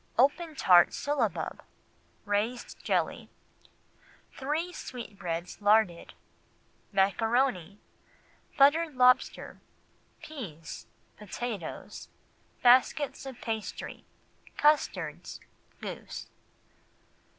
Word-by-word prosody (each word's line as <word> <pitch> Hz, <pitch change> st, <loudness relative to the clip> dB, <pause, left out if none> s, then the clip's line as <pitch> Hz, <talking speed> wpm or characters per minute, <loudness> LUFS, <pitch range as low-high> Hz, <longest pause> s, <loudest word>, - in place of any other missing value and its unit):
Open 300 Hz, +6 st, +2 dB
Tart 175 Hz, -8 st, +5 dB
Syllabub. 275 Hz, -8 st, -1 dB, 0.6 s
Raised 215 Hz, +4 st, -2 dB
Jelly. -, -, -1 dB, 1.0 s
Three 310 Hz, +6 st, -2 dB
Sweetbreads 180 Hz, -, -6 dB
Larded. 205 Hz, -4 st, +2 dB, 0.8 s
Maccaroni. 200 Hz, 0 st, +1 dB, 0.8 s
Buttered 295 Hz, +2 st, +4 dB
Lobster. 250 Hz, 0 st, +3 dB, 0.6 s
Peas. 195 Hz, -, -8 dB, 0.3 s
Potatoes. 210 Hz, -3 st, -6 dB, 0.5 s
Baskets 260 Hz, +3 st, +4 dB
of 260 Hz, -3 st, -8 dB
Pastry. 220 Hz, -2 st, -5 dB, 0.5 s
Custards. 300 Hz, 0 st, +1 dB, 0.4 s
Goose. -, -, -7 dB
240 Hz, 60 wpm, -29 LUFS, 200-280 Hz, 1.0 s, Tart